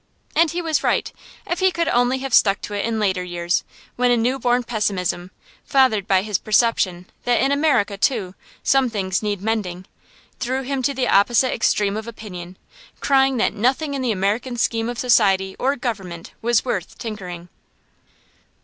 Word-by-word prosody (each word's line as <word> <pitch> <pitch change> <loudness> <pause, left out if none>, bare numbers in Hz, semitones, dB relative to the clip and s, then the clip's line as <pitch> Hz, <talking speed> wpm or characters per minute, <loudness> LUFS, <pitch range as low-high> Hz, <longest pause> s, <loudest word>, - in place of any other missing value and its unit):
And 330 0 +4
he 345 +2 -3
was 320 -2 0
right, - - 0 0.3
if 350 - -2
he 375 0 +4
could 335 -2 -1
only 245 -1 +2
have 265 -1 -5
stuck 200 -3 +5
to 210 - -6
it 205 - -1
in 230 -1 -1
later 190 -3 0
years, 175 0 -1 0.3
when 250 0 +3
a 245 - +4
new 250 +4 0
born 245 0 +1
pessimism, 195 -6 -2 0.3
fathered 255 -8 +2
by 190 -1 +3
his 210 -2 -1
perception 210 -6 +1 0.2
that 245 0 +2
in 270 - +2
America, 280 -9 +1
too, 200 -8 0 0.3
some 270 -2 +3
things 195 -4 -1
needed 205 -2 -3
mending, 190 -5 -2 0.5
threw 255 +2 -2
him 270 0 -2
to 275 +2 0
the 255 -1 0
opposite 240 +6 +3
extreme 205 -2 +1
of 220 +1 -5
opinion, 185 -6 -9 0.4
crying 270 -1 +3
that 230 - +1
nothing 260 +7 0
in 275 - -2
the 250 -3 0
American 215 +5 -1
scheme 230 0 0
of 245 - -5
society 195 -6 +3
or 275 +2 +1
government 195 -10 -5
was 235 0 +2
worth 195 -8 -3
tinkering. 180 -7 -7
225 Hz, 175 wpm, -21 LUFS, 195-255 Hz, 0.5 s, stuck